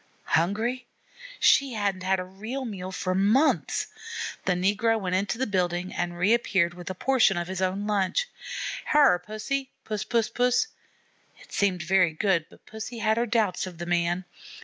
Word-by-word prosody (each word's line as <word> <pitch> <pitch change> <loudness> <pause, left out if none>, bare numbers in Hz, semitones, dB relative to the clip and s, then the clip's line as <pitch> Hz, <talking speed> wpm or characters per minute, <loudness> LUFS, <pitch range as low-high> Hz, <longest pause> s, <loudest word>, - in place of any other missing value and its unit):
Hungry! 225 +9 +1 0.5
She 275 -3 +4
hadn't 200 -3 -1
had 190 0 +1
a - - -2
real 220 +9 -6
meal 190 -5 -5
for 185 0 -2
months. 210 +11 +2 0.6
The 185 - +3
negro 205 +5 +2
went 185 -3 -3
into 200 +5 0
the 260 - 0
building 180 -3 -1
and 175 0 -3
reappeared 190 -3 +2
with 175 0 -8
a 185 - -4
portion 240 -4 +3
of 175 0 -2
his 190 0 -4
own 190 +2 0
lunch. 210 - +1 0.6
"Hyar, 285 -12 +5
Pussy, 215 +8 -3 0.2
Puss, 215 -2 -2
Puss, 230 -2 +1
Puss!" 250 - +2 0.7
It - - -17
seemed 185 -4 +1
very 180 -1 +3
good, 170 -2 +1
but - - -20
Pussy 220 +2 -7
had 220 0 +1
her 240 +1 +1
doubts 210 -5 +1
of 180 -2 -9
the 175 - -5
man. 175 +1 0
195 Hz, 170 wpm, -26 LUFS, 180-230 Hz, 0.7 s, Hyar